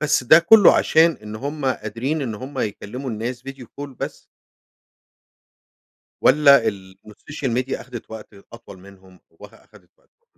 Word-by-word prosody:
بس 150 -4 0
ده 155 +6 +7
كله 200 +3 +6
عشان 165 0 +3
إن 105 0 -8
هم 140 +4 -6
قادرين 130 +5 -3
إن 115 -5 -4
هم 130 +5 -9
يكلموا 125 +4 -5
الناس 120 +3 -5
video 135 -2 -9 0.2
call 145 - -6
بس. - - -7 2.0
والّا 140 -2 +5
ال 95 -1 -9
إن - - -12
الsocial 135 -1 -6
media 135 - -6
أخدت 120 -3 -11
وقت 110 -1 -11 0.2
أطول 95 - -13
منهم 95 -1 -18
ووخ - - -16
أخدت - - -22
وقتهم؟ 470 - -40
125 Hz, 150 wpm, -21 LUFS, 105-145 Hz, 2.0 s, ده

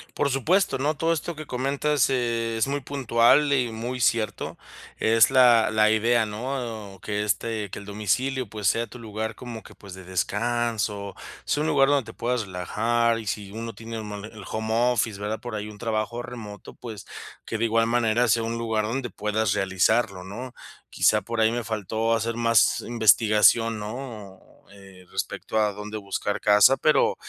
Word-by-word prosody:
Por 140 - +1
supuesto, 140 +4 +1
¿no?, 150 +3 0
todo 165 +2 +1
esto 165 +1 -4
que 155 0 -8
comentas, 140 +2 0
eh, 115 -3 -1
es 115 - +1
muy 140 0 -2
puntual 135 +2 +3
y 125 -4 +1
muy 120 +3 -4
cierto, 115 -2 0 0.4
es 115 0 +4
la 125 -4 +5
la 110 0 +4
idea, 115 +1 +3
¿no?, 110 -3 -5
que 105 0 -2
este, 105 0 -2
que - - -7
el 100 - -11
domicilio, 115 +4 -1
pues, 105 -3 -3
sea 115 +1 +1
tu - - -11
lugar 110 -1 -5
como 120 -3 -8
que, - - -15
pues, 100 -3 -12
de 95 - -10
descanso, 105 +2 -2 0.3
sea 150 - 0
un 155 - 0
lugar 135 -2 +4
donde 135 -6 +1
te - - -24
puedas 125 0 0
relajar, 115 +6 0
y 110 - -9
si 100 -1 -4
uno 115 +2 -6
tiene 115 0 -7
un 105 - -7
mo 105 - -6
el 110 -2 -11
home 110 0 -2 0.2
office, 110 -3 -1
¿verdad?, 105 +2 -3
por 120 -2 -7
ahí 105 0 -4
un 105 - -11
trabajo 115 +1 -2
remoto, 110 -4 -9
pues, 110 -5 -9 0.4
que 110 - -3
de 115 - 0
igual 115 0 +2
manera 120 0 +2
sea 115 0 +2
un 115 +1 -3
lugar 110 -2 -1
donde 120 +2 -3
puedas 105 -1 0
realizarlo, 95 +1 +1
¿no?, 120 +7 -8 0.4
quizá - - +3
por 115 0 -4
ahí 110 0 +4
me 120 0 -2
faltó 110 +1 -1
hacer 115 +1 -2
más 115 -2 +3
investigación, 110 0 +4
¿no?, 105 -3 -7 0.3
eh, 95 -2 -15
respecto 110 - -3
a 105 -1 +2
dónde 105 +2 -7
buscar 100 0 -3
casa, 105 +5 +6
pero 155 - +3
115 Hz, 185 wpm, -25 LUFS, 105-120 Hz, 0.4 s, casa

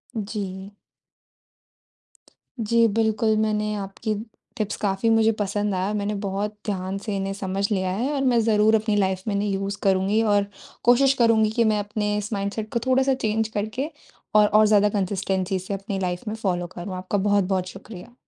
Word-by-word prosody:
जी। 200 -2 -5 1.9
जी, 230 +1 +3
बिल्कुल, 220 0 +1
मैंने 210 -1 0
आपकी 200 +2 -3 0.4
टिप्स 215 -2 -2
काफ़ी 200 +2 0
मुझे 225 0 +4
पसंद 205 0 -1
आया। 190 +3 -1
मैंने 210 0 -1
बहुत 205 +2 -3
ध्यान 190 -2 -2
से 210 -3 -2
इन्हें 195 0 -2
समझ 195 0 -2
लिया 185 -2 0
है 240 +10 -1
और 280 - -1
मैं 250 -3 +3
ज़रूर 215 0 +4
अपनी 215 -1 +1
लाइफ़ 190 -2 0
में 210 - 0
इन्हें 205 +1 0
यूज़ 195 +1 -2
करुँगी 195 +2 +2
और 205 -2 +3 0.4
कोशिश 260 +3 +5
करुँगी 225 -2 +4
कि 235 +1 +2
मैं 210 - +1
अपने 210 0 -2
इस 210 +1 -4
माइंडसेट 205 +2 -3
को 235 - +1
थोड़ा-सा 265 +1 +3
चेंज 220 -3 0
करके 220 +8 -2 0.5
और 210 0 +7
और 215 +1 +5
ज़्यादा 210 -1 +4
कंसिस्टेंसी 190 -1 -1
से 190 +2 -5
अपनी 195 0 -4
लाइफ़ 180 -1 -2
में 215 - -2
फ़ॉलो 180 -5 -1
करूँ। 185 +2 -5
आपका 185 +2 -2
बहुत-बहुत 195 -2 +1
शुक्रिया। 195 +3 -11
205 Hz, 170 wpm, -24 LUFS, 195-220 Hz, 1.9 s, और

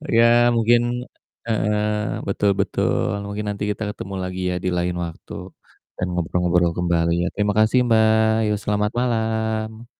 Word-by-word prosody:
Ya, 115 - +6 0.3
mungkin 115 +1 +4 0.7
heeh, 105 -1 0 0.5
betul 100 +1 +1
betul, - - 0 0.2
mungkin 105 +1 -4
nanti 100 0 -5
kita 110 - -4
ketemu 100 -1 -7
lagi 90 0 -4
ya, - - -2
di - - +2
lain 90 0 -1
waktu, 85 -1 -10 0.6
dan - - -1
ngobrol-ngobrol 90 0 +1
kembali, 85 -1 +1
ya. - - 0
Terima 105 0 +1
kasih, 110 +4 +4
Mbak, 110 -1 +3
ya 105 - +1
selamat 105 0 0
malam. 110 -1 -2
105 Hz, 145 wpm, -22 LUFS, 90-110 Hz, 0.7 s, Ya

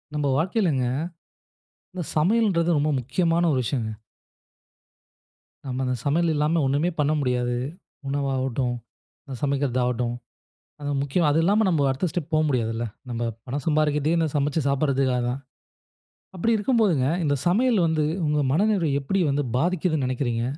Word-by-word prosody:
நம்ப 150 -1 0
வாழ்க்கையிலங்க. 165 - +1 1.1
இந்த 180 - -4
சமையல்ன்றது 180 0 +2
ரொம்ப 145 +1 +1
முக்கியமான 165 +7 +1
ஒரு 130 - +1
விஷயங்க. 115 -3 -2 1.8
நம்ம 130 0 -3
அந்த 125 0 0
சமையல் 165 +4 +2
இல்லாம 155 +3 +1
ஒண்ணுமே 145 +6 +1
பண்ண 150 0 +2
முடியாது. 125 -2 0 0.5
உணவாவட்டும், 135 -2 -1 0.5
இந்த 135 -2 -7
சமைக்கறதாவட்டும். 125 -4 0 0.7
அந்த 145 0 -2
முக்கிய 140 +6 0
அது 150 +2 +2
இல்லாம 210 +4 +3
நம்ம 155 -6 +2
அடுத்த 135 +7 0
ஸ்டெப் 170 -2 -4
போ 155 - +4
முடியாதுல்ல? 115 -3 -1 0.2
நம்ப 120 -1 -3 0.2
பணம் 135 +2 -4
சம்பாரிக்கிறதே, 150 0 +2
இந்த 165 -1 +2
சமச்சு 145 +2 +1
சாப்பிட்றதுக்காக 135 -2 +1
தான். 130 +3 -3 1.0
அப்பிடி 225 +6 +1
இருக்கும்போதுங்க, 205 - +2 0.2
இந்த 145 -2 +2
சமையல் 225 +5 +3
வந்து 160 -1 +1 0.2
உங்க 150 0 +1
மனநிலைய 170 -4 +2
எப்பிடி 195 +8 -1
வந்து 140 +1 0
பாதிக்கிதுன்னு 160 -2 0
நெனைக்கிறீங்க? 120 -2 -1
145 Hz, 130 wpm, -24 LUFS, 130-170 Hz, 1.8 s, போ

